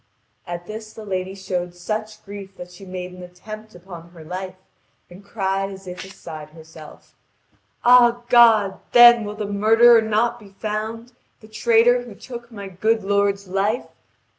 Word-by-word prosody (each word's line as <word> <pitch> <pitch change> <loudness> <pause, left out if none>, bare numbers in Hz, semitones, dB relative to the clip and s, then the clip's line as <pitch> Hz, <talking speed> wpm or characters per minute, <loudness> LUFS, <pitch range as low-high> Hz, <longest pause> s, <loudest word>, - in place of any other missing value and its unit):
At 175 0 -6
this 215 +2 -9
the 220 - -10
lady 190 -1 -4
showed 180 -2 -4
such 215 +3 -5
grief 195 -1 -10
that 180 0 -10
she 185 +2 -13
made 180 0 -6
an 180 - -12
attempt 215 +4 -11
upon 175 -2 -12
her 170 -2 -14
life, 185 +3 -6 0.6
and 185 +3 -13
cried 195 -1 -2
as 195 -1 -11
if 180 0 -8
beside 160 -5 -10
herself: 160 -1 -15 0.7
"All 240 -1 +5
God, 225 -5 +5
then 240 -2 +8
will 205 0 -6
the 210 0 -4
murderer 225 +3 +5
not 225 +2 0
be 205 -3 -15
found, 220 +2 -5 0.3
the 215 - -16
traitor 230 +2 +3
who 240 -4 -11
took 240 +1 -10
my 200 -3 -8
good 215 +4 0
lord's 200 0 0
life? 200 +5 -1
200 Hz, 160 wpm, -21 LUFS, 185-225 Hz, 0.7 s, then